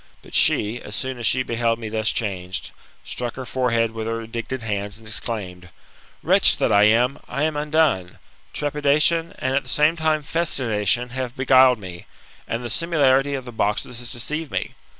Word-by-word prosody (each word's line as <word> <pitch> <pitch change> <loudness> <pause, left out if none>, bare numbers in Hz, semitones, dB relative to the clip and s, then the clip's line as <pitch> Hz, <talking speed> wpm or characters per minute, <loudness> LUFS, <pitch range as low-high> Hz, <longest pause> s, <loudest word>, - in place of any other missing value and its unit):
But - - -16
she, 110 +4 +5
as 105 - -5
soon 130 -1 -4
as 115 - 0
she 130 0 +2
beheld 115 -1 0
me 115 -1 -6
thus 110 0 0
changed, 95 -4 -3 0.3
struck 120 -1 -4
her 130 - -6
forehead 115 -1 0
with 110 -1 -5
her 115 0 -3
indignant 115 +2 -5
hands, 105 -1 -3
and 115 - -15
exclaimed, 95 -5 -5 0.5
''Wretch - - +5
that - - +1
I 100 +1 +5
am, 120 +5 +3
I 140 +3 -3
am 155 -1 0
undone 150 - +1
1 - - -23 0.3
Trepidation, 150 +4 +1
and 130 +1 -1
at 140 - +2
the - - -11
same 150 +2 +3
time 155 -2 0
festination, 125 - 0
have 130 -1 -5
beguiled 130 -1 +5
me, 90 -4 -10 0.4
and 115 +2 -3
the - - -4
similitude 140 -3 +2
of 130 -2 -6
the 120 - -8
boxes 110 +2 -2
has 120 -1 -6
deceived 150 +5 -4
me. - - -4
120 Hz, 185 wpm, -22 LUFS, 110-140 Hz, 0.5 s, she